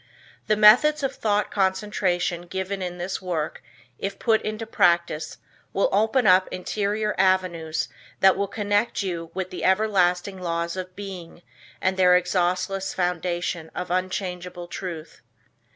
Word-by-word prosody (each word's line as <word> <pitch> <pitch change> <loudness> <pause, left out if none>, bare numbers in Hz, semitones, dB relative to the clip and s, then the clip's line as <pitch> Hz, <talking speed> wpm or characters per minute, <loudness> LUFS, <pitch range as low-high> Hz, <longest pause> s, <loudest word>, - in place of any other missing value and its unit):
The 215 - +3
methods 250 +9 +6
of 270 0 0
thought 210 -2 0
concentration 190 -3 0
given 190 +2 -4
in 180 -1 -4
this 180 +2 -4
work 170 -4 -3 0.4
if 195 0 -4
put 225 -2 +2
into 215 +1 -4
practice 170 -6 +1 0.4
will - - +2
open 225 +4 +2
up 185 0 +5
interior 210 +3 -2
avenues 185 -4 +1 0.3
that 190 0 +6
will 200 +1 -1
connect 205 +1 0
you 170 -3 -4
with 185 -1 -3
the 180 - -6
everlasting 190 -2 +2
laws 170 0 -2
of 185 -1 -6
Being 180 -4 -9 0.4
and 185 0 0
their 180 -1 +6
exhaustless 185 +2 -1
foundation 175 -2 -2
of 180 -1 -4
unchangeable 180 -1 -3
truth. 170 -3 -7
185 Hz, 135 wpm, -24 LUFS, 175-205 Hz, 0.4 s, methods